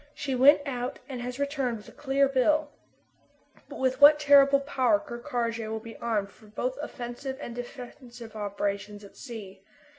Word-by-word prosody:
She 275 -2 -3
went 275 +4 +6
out 250 -1 -3
and 255 -3 -6
has 250 +1 -5
returned 275 -4 -1
with 210 - -14
a - - -12
clear 275 0 +1
bill. 290 +3 +2 1.0
But - - -8
with 260 +1 0
what 300 +1 +9
terrible 280 -1 +6
power 275 +1 +2
Ker 295 -6 -8
Karraje 230 -2 -3
will 220 0 -3
be 225 0 -11
armed 210 -4 -2
for 215 - -19
both 250 +5 -3
offensive 265 -1 -6
and 240 - -7
defensive 245 -2 -9
operations 205 0 -3
at 200 - -14
sea! 205 -6 -9
250 Hz, 170 wpm, -27 LUFS, 225-275 Hz, 1.0 s, what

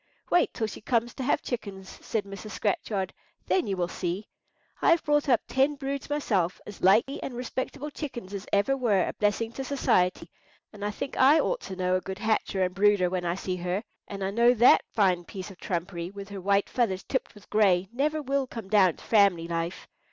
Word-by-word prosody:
"Wait 350 -1 +4
till 225 - -2
she 215 - -7
comes 235 +1 0
to - - -7
have 275 +3 +1
chickens," 195 -6 -6
said 220 -2 -1
Mrs. 200 +2 -8
Scratchard; 200 -2 -1 0.3
"then 370 - +1
you 195 -2 -1
will 175 -1 0
see. 180 +3 -4 0.5
I - - +4
have 335 0 +4
brought 295 -1 +2
up 245 - +4
ten 270 +3 +2
broods 275 0 -4
myself—as 205 - -1
likely 220 +9 +3
and 255 - -5
respectable 260 +4 -4
chickens 240 -10 -6
as 200 0 -6
ever 205 +7 +2
were 220 -8 +2
a - - -3
blessing 210 +2 0
to 270 - -5
society—and 205 -4 -2
I 205 - 0
think 270 +6 -5
I 280 +4 +6
ought - - 0
to 190 - -7
know 185 0 +1
a - - -4
good 190 0 -6
hatcher 215 -3 0
and 180 0 -1
brooder 200 -2 +3
when 180 -1 -2
I 170 0 0
see 185 -1 -3
her; 180 +4 -2 0.2
and 200 -1 -5
I 190 - -1
know 235 +3 +4
that 240 +2 +6
fine 185 -5 +2
piece 190 +2 -8
of 185 - -15
trumpery, 175 -1 -3
with 200 0 -9
her 200 -1 -7
white 200 +1 +2
feathers 195 -7 0
tipped 260 -3 -3
with 205 - -16
gray, 195 -4 +3
never 300 +4 0
will 275 0 0
come 225 -6 -8
down 190 -5 +4
to - - -15
family 200 -6 +3
life. 170 +1 -3
205 Hz, 205 wpm, -27 LUFS, 185-255 Hz, 0.5 s, I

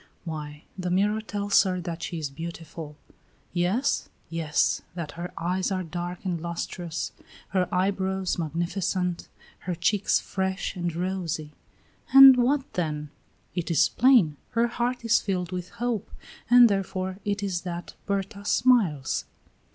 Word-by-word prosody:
"Why, 150 -2 -6
the 180 -2 -3
mirror 205 +4 +2
tells 205 -2 +2
her 185 -2 -1
that 170 -1 -5
she 170 - -4
is 150 -3 -4
beautiful." 165 -1 -8 0.6
"Yes?" 185 +10 +1 0.2
"Yes; 160 -3 +1
that 165 -4 -4
her 175 +3 -6
eyes 180 +3 -1
are 185 -1 -1
dark 175 +2 -5
and 175 -3 -1
lustrous, 170 0 -4 0.4
her 185 -2 +1
eyebrows 190 0 0
magnificent, 175 +2 -2 0.3
her 180 0 -3
cheeks 200 +4 +2
fresh 190 0 -2
and 175 -2 -2
rosy." 175 -4 -3 0.6
"And 270 -1 +11
what 260 +3 +1
then?" 150 -4 -2 0.4
"It 175 -1 -3
is 165 -4 +4
plain; 225 - +4 0.2
her 230 +1 +3
heart 240 +1 -2
is 230 - +4
filled 180 -3 -2
with 180 -1 -4
hope, 235 -2 -3 0.4
and 245 0 +9
therefore 190 -2 -2
it 205 0 -2
is 185 -3 -1
that 175 -1 -6
Berta 200 +1 -2
smiles." 205 - +2
185 Hz, 135 wpm, -26 LUFS, 170-200 Hz, 0.6 s, And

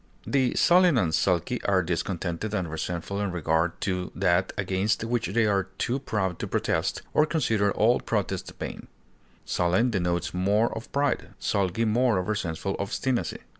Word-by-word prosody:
The 130 -3 +1
sullen 175 -4 +5
and 85 -8 +1
sulky 90 +9 +1
are 95 -2 +3
discontented 90 +3 -2
and 90 -6 -2
resentful 85 +5 -3
in 100 -2 -1
regard 80 0 0
to 90 -2 -2
that 90 0 +2
against 100 +2 0
which 115 0 -1
they 115 +3 +2
are 100 -2 +2
too 130 +2 -1
proud 95 -9 -2
to - - -3
protest, - - -1
or 150 - +4
consider 115 -10 +1
all 115 +5 +3
protest 100 -4 -2
vain; - - -6 0.6
sullen 90 +8 +1
denotes 90 -3 -1
more 100 +5 +1
of 110 - -8
pride, 140 +1 -1
sulky 100 +3 0
more 115 0 +2
of 90 - -2
resentful 95 -2 -2
obstinacy. 120 +5 -2
100 Hz, 155 wpm, -26 LUFS, 90-115 Hz, 0.6 s, sullen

